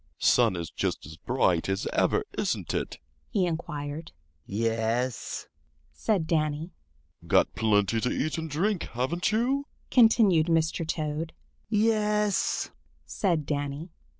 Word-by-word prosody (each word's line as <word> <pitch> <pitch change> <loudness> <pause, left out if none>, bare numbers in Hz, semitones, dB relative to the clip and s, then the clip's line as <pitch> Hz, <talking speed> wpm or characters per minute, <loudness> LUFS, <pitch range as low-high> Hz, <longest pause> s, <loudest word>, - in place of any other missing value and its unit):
"Sun 115 -6 +4
is 85 -2 -5
just - - -2
as 75 +1 -9
bright 95 -5 +1
as 95 0 -1
ever, - - +2
isn't - - -1
it?" - - -2 0.3
he 195 -4 +1
inquired. 155 -2 -4 0.4
"Yes," 115 +2 -1 0.5
said 165 - 0
Danny. 155 +1 0 0.6
"Got - - +3
plenty 105 0 +2
to 125 - +1
eat 155 +2 -1
and 160 0 -4
drink, 180 +6 0
haven't 140 - 0
you?" 260 +6 +1 0.2
continued 220 -9 +5
Mr. 165 0 +1
Toad. 155 0 -2 0.4
"Yes," 210 -1 +1 0.3
said 170 -7 0
Danny. 145 +3 -3
155 Hz, 120 wpm, -28 LUFS, 125-185 Hz, 0.6 s, continued